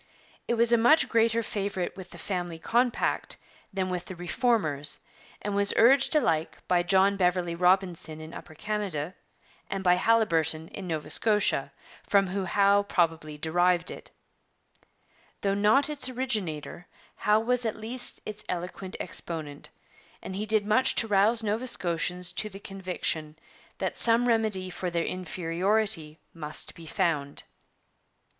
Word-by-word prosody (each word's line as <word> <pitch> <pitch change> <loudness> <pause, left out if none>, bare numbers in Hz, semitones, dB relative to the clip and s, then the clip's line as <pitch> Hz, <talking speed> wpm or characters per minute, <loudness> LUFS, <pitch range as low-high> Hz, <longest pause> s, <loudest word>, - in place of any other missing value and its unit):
It 235 - +1
was 235 +1 +3
a 235 - +5
much 295 +8 +5
greater 230 0 +2
favourite 200 -4 -3
with 185 -1 -10
the 175 - -11
'Family 175 -1 -3
Compact' 240 +8 0 0.3
than 190 -2 -2
with 180 -1 -3
the 185 - -8
Reformers, 175 - 0 0.5
and 205 - -2
was 200 0 +1
urged 270 +6 +5
alike 165 - +1
by 180 -1 +3
John 190 +2 +3
Beverley 180 -2 +1
Robinson 180 -3 +1
in 155 +1 -9
Upper 155 - -10
Canada 190 -6 -3 0.6
and 195 -1 -3
by 180 -1 +4
Haliburton 165 -8 +2
in 195 -2 -7
Nova 160 -3 -3
Scotia, 210 -10 +3 0.3
from 200 -1 +3
whom 190 +1 -3
Howe 200 0 +4
probably 165 -6 -1
derived 175 +2 +1
it. - - -10
But - - -37 0.5
though 195 -1 +1
not 210 +8 +3
its 295 -3 -2
originator, 210 - -3 0.3
Howe 210 +1 +3
was 245 +2 +1
at 220 -2 -1
least 235 +3 -3
its 215 0 -6
eloquent 180 +2 -5
exponent, 155 -3 -4 0.5
and 190 - -7
he 210 +2 -3
did 215 -1 +2
much 215 +5 +3
to 225 - +2
rouse 215 +3 +3
Nova 220 +4 -1
Scotians 180 -3 -1
to 215 - -1
the 195 -1 -10
conviction 180 -6 -3 0.4
that - - -2
some 235 +1 +5
remedy 215 -5 +1
for 180 0 -3
their 170 -1 -1
inferiority 180 -1 0
must 155 -2 -2
be 165 -1 -12
found. 145 -4 -1
190 Hz, 145 wpm, -27 LUFS, 170-220 Hz, 0.6 s, a